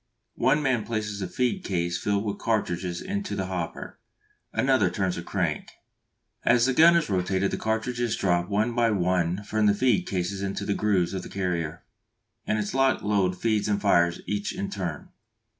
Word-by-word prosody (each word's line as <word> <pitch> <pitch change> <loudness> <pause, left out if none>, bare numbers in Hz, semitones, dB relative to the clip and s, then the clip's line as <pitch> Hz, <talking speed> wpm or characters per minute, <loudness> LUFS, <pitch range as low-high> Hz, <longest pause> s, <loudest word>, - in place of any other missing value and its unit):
One 150 +4 +3
man 125 -5 +1
places 105 -3 -3
a 95 - -2
feed 125 - -1
case 85 -2 -1
filled 100 +2 0
with 100 -1 -3
cartridges 90 -5 -1
into 200 0 -3
the 95 - -2
hopper, 90 -3 -5 0.5
another 130 -7 +2
turns 95 0 -1
the - - -4
crank. 85 -4 -2 0.8
As 120 -1 +4
the 130 - +2
gun 165 +5 +7
is 170 -2 +2
rotated 95 0 0
the - - -2
cartridges 115 +1 -1
drop 90 -1 +1
one 105 +4 +1
by 120 -1 +2
one 90 -1 0
from 110 +1 +1
the 100 - +4
feed 125 -2 +2
cases 95 +1 -2
into 100 0 -3
the 100 - 0
grooves 100 -4 +1
of 95 - -3
the - - -9
carrier, 85 -4 -3 0.6
and 110 - +1
its 105 -1 -2
lock 135 0 +2
loads 95 -2 0 0.2
and 105 -1 +1
fires 85 -4 +2
each 105 0 -2
in 100 - -4
turn. 90 -7 -5
100 Hz, 175 wpm, -26 LUFS, 90-115 Hz, 0.8 s, gun